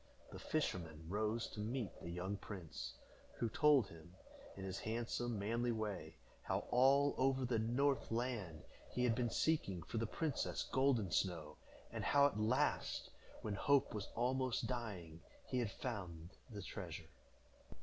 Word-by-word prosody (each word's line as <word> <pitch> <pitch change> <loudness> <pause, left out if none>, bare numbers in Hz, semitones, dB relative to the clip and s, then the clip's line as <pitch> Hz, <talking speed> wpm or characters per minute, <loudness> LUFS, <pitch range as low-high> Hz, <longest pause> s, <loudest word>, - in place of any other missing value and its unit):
The - - -7
fisherman 80 -2 -2
rose 110 +5 0
to - - -7
meet 115 +1 -1
the 85 - -6
young 90 +3 -2
prince, 95 -5 -6 0.4
who 115 - 0
told 145 +1 +5
him, 85 +2 -13 0.4
in 95 - -5
his 95 0 -3
handsome, 115 +1 -1
manly 115 +4 +1
way, 110 -3 -3 0.3
how - - -1
all 135 +3 +6
over 135 0 +3
the 120 -2 +1
north 130 +4 +2
land 115 -9 -2 0.3
he 125 - -1
had 120 -2 +4
been 120 0 +1
seeking 100 - +1
for 115 - -3
the 115 - 0
princess 155 +3 -1
Golden 130 -8 +2
Snow; 80 -5 0 0.4
and - - -3
how 140 0 +6
at 140 -7 +2
last, 110 +4 +1 0.3
when 105 - -1
hope 140 +6 +3
was 105 -2 -3
almost 130 +1 +1
dying, 95 -10 -4 0.2
he 125 - 0
had 120 -4 +1
found 90 -8 -5 0.2
the 105 -4 -6
treasure. 85 -4 -6
110 Hz, 150 wpm, -39 LUFS, 95-125 Hz, 0.4 s, all